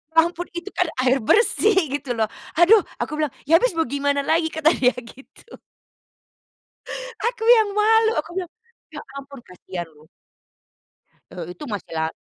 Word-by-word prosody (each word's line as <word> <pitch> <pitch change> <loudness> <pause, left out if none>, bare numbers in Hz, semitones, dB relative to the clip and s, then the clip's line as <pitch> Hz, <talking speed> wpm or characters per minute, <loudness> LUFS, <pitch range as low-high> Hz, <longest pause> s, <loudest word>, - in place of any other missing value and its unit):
Ampun 340 +2 +2
itu 345 +3 -5
kan 360 - 0 0.2
air 260 +1 +3
bersih 425 - +3 0.2
gitu 250 -4 -5
loh. 220 -1 0 0.3
"Aduh!" 360 +7 +6 0.2
aku 305 - -3
bilang, 300 -4 -1
"Ya 330 +3 +5
habis - - 0
mau 325 - +2
gimana 285 0 -1
lagi?" 320 +3 +1
kata 315 0 +2
dia 250 0 +2
gitu 250 - -13 1.7
Aku 475 -1 -4
yang 435 -2 +2
malu. 445 +1 +4
Aku 305 - -6
bilang, 365 -3 -4 0.4
"Ya 295 - -7 0.2
ampun 275 -1 -10
kasihan 180 -1 -8
loh." 150 +1 -21 1.2
Eee, 175 -1 -7
itu - - -10
masih 205 -3 -6
la 160 0 -1
305 Hz, 150 wpm, -22 LUFS, 250-355 Hz, 1.7 s, Aduh